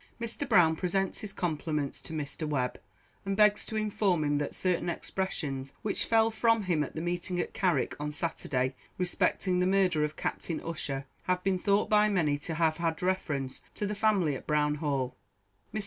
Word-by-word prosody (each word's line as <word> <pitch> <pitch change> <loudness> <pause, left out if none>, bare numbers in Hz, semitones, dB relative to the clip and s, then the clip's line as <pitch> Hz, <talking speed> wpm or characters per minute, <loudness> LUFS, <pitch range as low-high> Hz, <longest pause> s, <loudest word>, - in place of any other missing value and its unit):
Mr. 235 +4 -3
Brown 160 -2 +6
presents 190 +3 0
his 210 - -4
compliments 155 -5 -2
to - - -9
Mr. 155 0 -3
Webb, 125 -4 -1 0.4
and 195 0 -2
begs 210 -1 +4
to 220 - -5
inform 205 -5 +1
him 145 0 +1
that 145 - -3
certain 180 -1 +1
expressions 145 -7 -3
which 210 - -1
fell 225 0 +4
from 225 -1 +3
him 170 -5 +1
at - - -7
the 160 - -3
meeting 175 +1 -2
at - - -2
Carrick 185 -3 +1
on 150 0 -2
Saturday 140 -5 -1 0.2
respecting 180 0 +1
the 180 - +3
murder 185 -5 +3
of 150 0 -2
Captain 165 - -2
Ussher, 145 -4 -3 0.2
have 180 0 0
been 190 -1 +1
thought 200 +2 +2
by 210 0 +4
many 155 -8 +1
to 160 +2 -4
have 160 -1 +2
had 165 0 -1
reference 145 -8 -1
to 210 - -2
the 205 - -1
family 200 -7 +2
at 130 - -7
Brown 150 -1 +2
Hall. 135 -4 -1 0.6
Mr. 215 - -2
175 Hz, 185 wpm, -30 LUFS, 150-195 Hz, 0.6 s, Brown